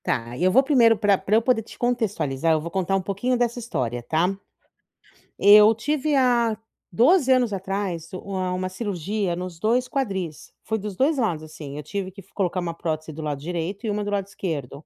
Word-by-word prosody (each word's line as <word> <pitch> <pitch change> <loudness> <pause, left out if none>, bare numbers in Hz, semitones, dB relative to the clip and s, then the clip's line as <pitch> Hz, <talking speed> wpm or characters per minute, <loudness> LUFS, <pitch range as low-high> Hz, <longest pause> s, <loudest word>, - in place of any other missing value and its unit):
Tá. 120 +1 -2
E, 145 - -3
eu 185 - +4
vou 265 +7 +5
primeiro 240 -6 +4
pra 205 -2 +3
pra 210 - 0
eu 225 - +5
poder 240 -1 +2
te 220 - -14
contextualizar, 200 - 0
eu 155 - +1
vou 170 +2 -6
contar 190 0 0
um 195 - +1
pouquinho 205 +7 -1
dessa 240 0 0
história, 125 - -3
tá? 165 +9 0 1.0
Eu 210 +2 +8
tive 295 +5 -1
há 240 -4 +3 0.4
12 265 - +4
anos 250 -3 +3
atrás 190 -3 -4
u 185 - -5
uma 185 -2 -3
uma 185 0 -2
cirurgia 195 -1 -2
nos 180 -1 -6
2 240 +5 +1
quadris. 195 - -4
Foi 220 - -1
dos 205 -2 -6
2 285 - +2
lados, 180 -11 0
assim. 155 -2 -9
Eu 150 - -6
tive 190 +4 -4
que 195 +2 -12
f 195 - -26
colocar 185 -2 -1
uma 170 -2 -3
prótese 155 -1 -3
do 155 +1 -7
lado 145 -2 -3
direito 180 +7 -4
e - - 0
uma 210 0 -1
do 205 - -3
lado 200 -1 -1
esquerdo. 150 -7 -5
195 Hz, 210 wpm, -24 LUFS, 170-230 Hz, 1.0 s, Eu